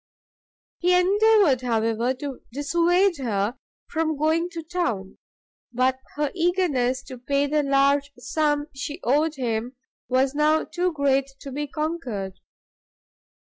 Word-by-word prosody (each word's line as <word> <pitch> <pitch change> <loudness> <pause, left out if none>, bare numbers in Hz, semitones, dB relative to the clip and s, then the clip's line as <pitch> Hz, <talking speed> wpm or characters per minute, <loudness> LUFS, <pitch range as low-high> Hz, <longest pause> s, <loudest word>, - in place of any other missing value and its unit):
He 360 +1 +4
endeavoured, 400 - +4
however, 230 +1 0
to 275 0 -6
dissuade 340 +7 +2
her 220 -3 -1 0.3
from 315 -2 -1
going 320 +3 +1
to 335 -2 -7
town, 315 - -3 0.5
but 255 +2 +1 0.2
her 295 -1 -1
eagerness 325 -8 +1
to 255 -2 -10
pay 280 +3 +1
the 300 +1 +1
large 280 0 +2
sum 295 -2 0
she 290 +4 -5
owed 300 +5 +2
him, 240 -1 -2 0.3
was 260 +1 +2
now 305 +1 +3
too 360 0 -1
great 275 -3 +1
to 275 - -7
be 295 +2 -3
conquered. 265 - -4
285 Hz, 125 wpm, -24 LUFS, 255-325 Hz, 0.5 s, He